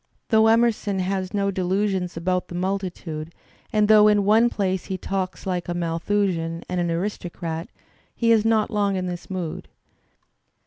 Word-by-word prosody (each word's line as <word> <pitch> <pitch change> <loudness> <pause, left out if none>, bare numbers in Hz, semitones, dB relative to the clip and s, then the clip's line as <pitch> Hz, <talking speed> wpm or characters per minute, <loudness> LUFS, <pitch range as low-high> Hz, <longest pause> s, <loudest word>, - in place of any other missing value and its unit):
Though 220 -1 +5
Emer 230 +1 +5
son 205 -2 -4
has 185 0 -2
no 200 -1 0
delusions 190 -1 -1
about 180 +2 -1
the 175 - -8
multitude, 175 -4 -4 0.4
and 210 -1 +3
though 215 -1 +7
in 205 -1 +3
one 220 +3 +5
place 190 -4 -1
he 190 - -3
talks 190 +1 -4
like 180 -2 -2
a 175 - -1
Malthusian 170 0 -1
and 180 -1 -1
an 170 - 0
aristocrat'*' 170 -2 -4 0.5
he 230 -1 +2
is 220 -2 +5
not 225 -1 +2
long 205 -2 +1
in 185 -1 -2
this 175 -1 -6
mood. 180 -4 -4
190 Hz, 165 wpm, -23 LUFS, 175-210 Hz, 0.5 s, though